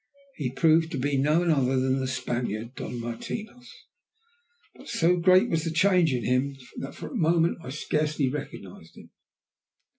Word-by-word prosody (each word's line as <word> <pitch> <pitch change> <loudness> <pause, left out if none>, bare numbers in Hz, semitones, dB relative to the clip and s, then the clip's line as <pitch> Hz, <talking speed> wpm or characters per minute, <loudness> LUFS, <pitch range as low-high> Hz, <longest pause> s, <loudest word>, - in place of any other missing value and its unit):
He 140 -5 -2
proved 160 +4 +3
to - - -2
be 140 +2 0
none 155 +5 +2
other 135 -3 +2
than 130 +1 +1
the 130 - -2
Spaniard, 120 -2 -3
Don 125 - -6
Martinos, 215 - -6 1.0
but - - -15
so 175 +2 +2
great 185 +2 +5
was 160 -1 0
the 165 - -2
change 175 -1 +3
in 125 -2 -1
him 130 +2 0 0.2
that 135 - -6
for - - -7
a - - -8
moment 170 -3 +2
I 125 - -7
scarcely 150 0 -1
recognized 115 - -7
him. - - -14
145 Hz, 160 wpm, -26 LUFS, 130-165 Hz, 1.0 s, great